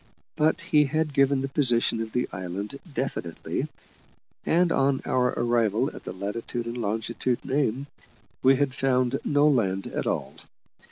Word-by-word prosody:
But 155 +2 +2
he 155 -4 +3
had 155 +1 -1
given 135 0 +3
the 135 - -1
position 120 -5 +2
of 110 -1 -5
the 125 +2 0
island 95 +4 -5 0.2
definitely, 125 - -3 0.8
and, 175 +1 +3
on 135 -2 +2
our 125 -1 +2
arrival 120 +2 +1
at - - -11
the - - -4
latitude 105 +5 -4
and 115 +1 -5
longitude 115 +3 -2
named, 135 -1 0 0.6
we 135 +1 +6
had 135 -1 0
found 130 -2 +1
no 145 0 +3
land 95 -9 +1
at - - -3
all. - - -2
130 Hz, 150 wpm, -26 LUFS, 115-140 Hz, 0.8 s, we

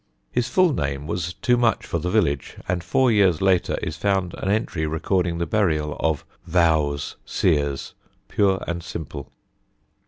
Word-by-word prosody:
His 125 0 0
full 185 -1 +4
name 70 - -2
was 85 +1 -3
too 125 -1 +2
much 120 -2 +2
for 85 - -2
the 90 +3 -2
village, 85 -10 0
and 90 -1 -1
four 125 +8 +3
years 95 -7 +4
later 95 -2 +2
is 80 - -3
found 95 -1 0
an 95 - -2
entry 100 -7 0
recording 85 +2 0
the 85 - -1
burial 80 -8 0
of 80 -2 0 0.2
"Vowes 80 -4 +1
Seers" 70 -2 0 0.3
pure 95 -2 +1
and 85 0 -2
simple. 75 -4 -7
85 Hz, 155 wpm, -23 LUFS, 75-100 Hz, 0.3 s, full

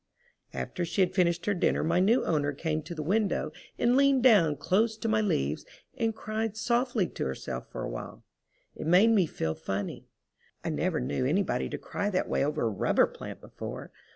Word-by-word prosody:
After 180 - -4
she 175 +4 0
had 180 - +2
finished 170 -2 +1
her 205 - +2
dinner 180 - +1
my 170 +2 +2
new 220 +7 +3
owner 145 -3 +1
came 155 +2 -2
to 170 - -8
the 155 - -4
window 205 +5 0 0.3
and 240 +1 +3
leaned 275 -2 +4
down 195 - +6
close 215 - +1
to 225 - -3
my 215 -1 +2
leaves 75 - 0 0.3
and 225 -3 0
cried 220 0 -3
softly 240 -3 +1
to - - -4
herself 65 0 -5
for - - -5
a - - -2
while. - - -7 0.5
It - - -5
made 190 +7 +6
me 195 -7 +4
feel 80 - -2
funny. 95 +3 -4 0.6
I - - -2
never - - 0
knew 70 - -1
anybody 190 +8 0
to - - -4
cry 205 - -3
that 185 -2 0
way - - +1
over 150 +2 -1
a 115 - +2
rubber 100 - +3
plant - - -9
before. - - -8
185 Hz, 195 wpm, -29 LUFS, 155-220 Hz, 0.6 s, down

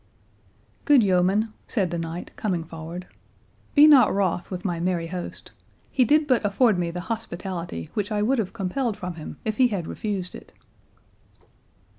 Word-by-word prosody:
"Good 285 -6 +6
yeoman," 195 +3 +2
said 190 -7 0
the 170 - -2
knight, 165 +1 -5
coming 180 -6 -1
forward, 165 +2 -8 0.7
"be 295 0 +9
not 280 -7 +7
wroth 185 -3 0
with 185 0 -6
my 175 -3 -1
merry 175 -1 0
host. 175 +1 -6 0.4
He 255 -2 +3
did 300 +5 +4
but 255 -5 +2
afford 205 -1 +3
me 170 -1 0
the 175 +1 -5
hospitality 175 - -5
which 205 -1 -2
I 210 -1 +1
would 255 +3 +2
have 200 -4 -1
compelled 225 +2 -2
from 180 -3 -5
him 160 -2 -8
if 215 -1 -2
he 255 - +5
had 200 -7 -3
refused 195 -3 -4
it." - - -12
190 Hz, 165 wpm, -25 LUFS, 175-225 Hz, 0.7 s, be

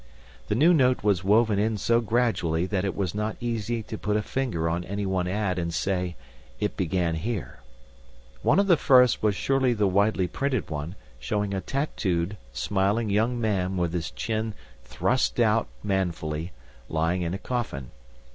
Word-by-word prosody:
The - - 0
new 160 +9 +5
note 130 -7 +3
was 100 -4 +2
woven 105 +1 +3
in 110 +1 +1
so 115 +3 +2
gradually 110 -8 +1
that 95 -1 -1
it 100 - -2
is 95 -3 -1
not 105 +1 -2
easy 115 -1 -2
to 110 0 -7
put 105 0 0
a 105 - -1
finger 115 -13 -1
on 85 +2 -1
any 100 +3 -3
one 95 -2 0
ad 95 -1 -1
and 85 -1 -2
say, 90 0 -1 0.4
"It 105 -1 -1
began 90 -2 0
here." 95 - -4 0.8
One - - +3
of 200 - +4
the 175 -4 +5
first 125 -4 +5
was 105 -2 +2
surely 130 +2 +2
the 105 -3 +1
widely 100 0 +2
printed 130 -1 -2
one 75 +4 -4 0.2
showing 100 - -1
a 95 - -1
tattooed, 100 - -1 0.2
smiling 100 - 0
young 115 +4 +1
man 95 -4 0
with 85 -2 0
his 85 -2 -2
chin 110 -1 -3 0.3
thrust 125 - 0
out 115 -1 +3 0.2
manfully, 85 -4 -2 0.4
lying 80 +3 0
in 85 +1 -2
a - - -3
coffin. 100 - -4
100 Hz, 170 wpm, -26 LUFS, 90-115 Hz, 0.8 s, new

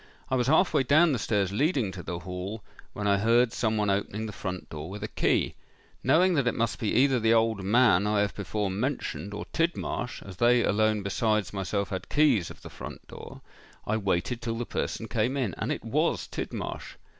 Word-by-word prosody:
I - - +3
was 125 -1 +1
half 160 +6 +4
way 150 - +4
down 150 +6 +4
the 130 - 0
stairs 100 -3 0
leading 130 - +1
to 95 - -7
the 85 0 -5
hall, 90 +4 -6 0.3
when 105 - -4
I 100 -1 +3
heard 115 +3 +3
some 110 -2 0
one 105 -1 +1
opening 100 +2 -2
the 110 - -5
front 95 -2 -5
door 80 +2 -7
with 105 +2 -7
a - - -2
key. - - +1 0.5
Knowing 170 +8 +4
that 140 -6 +1
it 125 - +1
must 115 -2 -1
be 110 - -1
either 130 0 +4
the 115 0 +4
old 115 -2 +2
man 105 -2 +4
I 105 -1 +2
have 105 - 0
before 100 0 -2
mentioned, 110 -1 -3
or 105 - -5
Tidmarsh, 165 -7 -2
as 95 -2 -10
they 120 +1 +4
alone 110 0 +2
besides 105 +1 0
myself 95 0 -2
had 95 - -5
keys 140 - +3
of - - -13
the - - -8
front - - -9
door, - - -10 0.4
I 110 - 0
waited 100 +4 -1
till 115 -1 -3
the 120 - -3
person 115 - -3
came 120 +5 0
in; 120 -10 -1
and - - -1
it - - -4
was - - 0
Tidmarsh. - - -5
110 Hz, 210 wpm, -28 LUFS, 100-125 Hz, 0.5 s, half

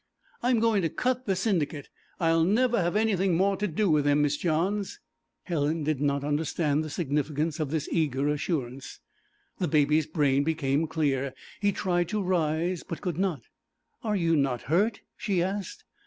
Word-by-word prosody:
'I'm 245 -1 +2
going 220 -3 +3
to 165 - 0
cut 255 +4 -1
the 195 - +2
Syndicate; 165 -8 -1 0.3
I'll 165 -1 +3
never 235 +4 +2
have 175 +2 0
anything 195 -5 +2
more 195 +2 +2
to 210 - -1
do 200 +4 0
with 150 -4 +3
them, 145 0 +3
Miss 145 0 +1
Johns.' 190 - -1 0.4
Helen 155 -2 -1
did 150 -2 -1
not 140 -1 +1
understand 150 0 0
the 155 - -5
significance 150 +1 -1
of 155 -3 -1
this 155 -1 -2
eager 145 -4 +1
assurance. 140 -3 -3 0.6
The 180 - 0
Baby's 150 0 +3
brain 145 -3 +2
became 155 -1 0
clear; 140 -4 -1 0.2
he 205 0 +2
tried 175 -3 0
to 210 0 -1
rise, 170 0 0
but 165 - -7
could 175 -3 -3
not. 180 -10 -1 0.6
'Are 215 -2 0
you 165 -3 +2
not 135 -4 0
hurt?' 200 +7 +1 0.2
she 190 -5 0
asked. 195 +1 -4
165 Hz, 170 wpm, -27 LUFS, 145-190 Hz, 0.6 s, going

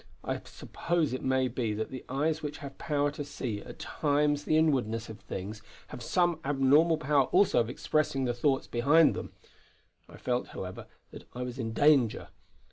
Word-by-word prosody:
I - - -3
suppose 165 -5 -2
it 130 - -3
may 130 0 +2
be 115 -4 -2
that 110 +1 -4
the 130 - -7
eyes 150 +4 0
which 150 -1 -5
have 140 -1 -9
power 145 -2 0
to 145 0 -5
see 130 -7 -5
at - - -11
times 145 0 0
the 155 - +3
inwardness 120 -8 +1
of 110 - -9
things 105 +3 -6 0.3
have - - -8
some 175 +5 +1
abnormal 145 +4 +4
power 145 -2 +2
also 195 +7 +3
of 115 -1 0
expressing 135 0 0
the 120 - 0
thoughts 135 +2 +1
behind 145 +7 +4
them. - - -6 0.8
I - - -12
felt, 125 0 -1
however, 90 0 -6 0.2
that - - -11
I 125 - -3
was 125 +1 -6
in 115 -2 -2
danger. 140 -5 +3
135 Hz, 180 wpm, -29 LUFS, 120-150 Hz, 0.8 s, abnormal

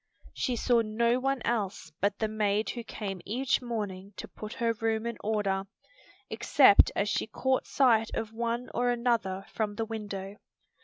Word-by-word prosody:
She 250 - -1
saw 235 0 +3
no 235 +3 +1
one 270 0 -1
else 200 -8 -2
but 200 +1 +1
the 220 - 0
maid 215 0 0
who 235 - -6
came 195 -5 -5
each 255 +6 0
morning 205 -5 -4
to - - -6
put 215 0 -8
her 230 -2 0
room 225 0 -1
in 235 -1 -2
order; 200 -2 0 0.6
except 260 -8 +5
as 200 - +1
she 210 - 0
caught 260 +4 0
sight 230 -5 +3
of 220 0 -3
one 235 +2 -2
or 245 0 +1
another 235 -6 0
from 210 -2 -1
the 225 - -2
window. 205 -3 -6
220 Hz, 165 wpm, -29 LUFS, 205-235 Hz, 0.6 s, except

